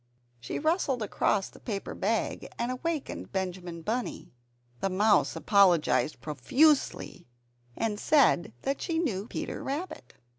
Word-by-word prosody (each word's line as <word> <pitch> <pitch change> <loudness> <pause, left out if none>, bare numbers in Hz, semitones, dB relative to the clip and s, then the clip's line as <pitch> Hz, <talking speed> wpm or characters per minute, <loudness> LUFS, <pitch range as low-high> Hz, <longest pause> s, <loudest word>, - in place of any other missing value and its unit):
She 120 - -5
rustled 300 - 0
across 200 -1 +1
the - - -16
paper 205 -5 -4
bag, 220 +3 -1
and 240 +1 -1
awakened 300 +3 -4
Benjamin 180 -3 -4
Bunny. 235 +5 -3 0.5
The 195 - 0
mouse 205 +1 +3
apologized 180 -6 +3
profusely, 215 - +1 0.5
and 215 -2 -1
said 270 - +3
that 275 - -1
she 330 -2 -1
knew 225 - -1
Peter - - -5
Rabbit. 280 - -5
215 Hz, 120 wpm, -29 LUFS, 185-275 Hz, 0.5 s, mouse